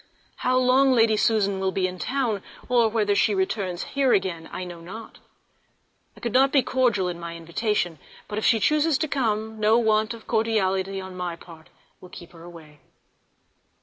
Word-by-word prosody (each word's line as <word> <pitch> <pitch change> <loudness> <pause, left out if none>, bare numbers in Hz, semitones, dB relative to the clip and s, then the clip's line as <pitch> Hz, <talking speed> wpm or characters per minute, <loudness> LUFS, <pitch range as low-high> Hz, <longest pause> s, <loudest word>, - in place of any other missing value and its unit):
How 255 0 +1
long 255 +2 +4
Lady 225 -2 +4
Susan 205 -3 +1
will 190 0 0
be 190 0 0
in 185 0 -4
town, 245 -6 -1 0.3
or 240 -3 +3
whether 210 -2 +1
she 205 +1 +2
returns 190 -2 -2
here 275 -2 +3
again, 180 -4 -1
I 185 - -5
know 175 -1 -8
not. 215 +6 -10 1.0
I - - -12
could 235 -2 -4
not 270 +1 +4
be 275 -3 +3
cordial 235 -8 +1
in 175 -1 -5
my 170 0 -7
invitation, 170 0 -2 0.3
but 210 0 -3
if - - -6
she 225 - +4
chuses 305 +5 +2
to 315 - -1
come 220 -5 -2
no 215 +2 +4
want 220 -1 +1
of 225 - -15
cordiality 195 -4 0
on 190 -1 -8
my 180 -2 -4
part 165 -2 -15 0.3
will 180 - -14
keep 175 -1 -12
her 165 - -15
away. 165 -3 -13
210 Hz, 180 wpm, -24 LUFS, 180-235 Hz, 1.0 s, long